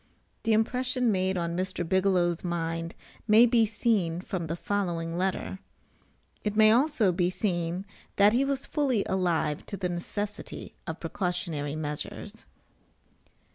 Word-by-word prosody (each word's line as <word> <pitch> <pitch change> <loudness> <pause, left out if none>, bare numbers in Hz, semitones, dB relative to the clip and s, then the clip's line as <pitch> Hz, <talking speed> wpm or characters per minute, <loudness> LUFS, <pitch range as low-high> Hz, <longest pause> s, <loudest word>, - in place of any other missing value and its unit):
The 225 - +2
impression 250 +2 +2
made 190 -1 +1
on 170 -1 -2
Mr. 180 -1 -2
Bigelow's 180 -2 +2
mind 165 -1 -3 0.3
may 220 +2 +8
be 230 -2 +4
seen 205 -6 +1
from 180 -2 -4
the 165 - -2
following 170 -4 -2
letter; 190 +1 -2 0.8
it 210 -1 -1
may 215 0 +7
also 240 -5 +3
be 175 0 +1
seen 180 -1 -2 0.3
that 205 +1 +5
he 250 +3 +3
was 275 0 -1
fully 265 -9 0
alive 170 -5 0
to 200 - -5
the 185 -2 -2
necessity 205 +4 -5
of 160 -1 -4
precautionary 165 -4 -2
measures. 150 -1 -6
185 Hz, 135 wpm, -28 LUFS, 170-215 Hz, 0.8 s, may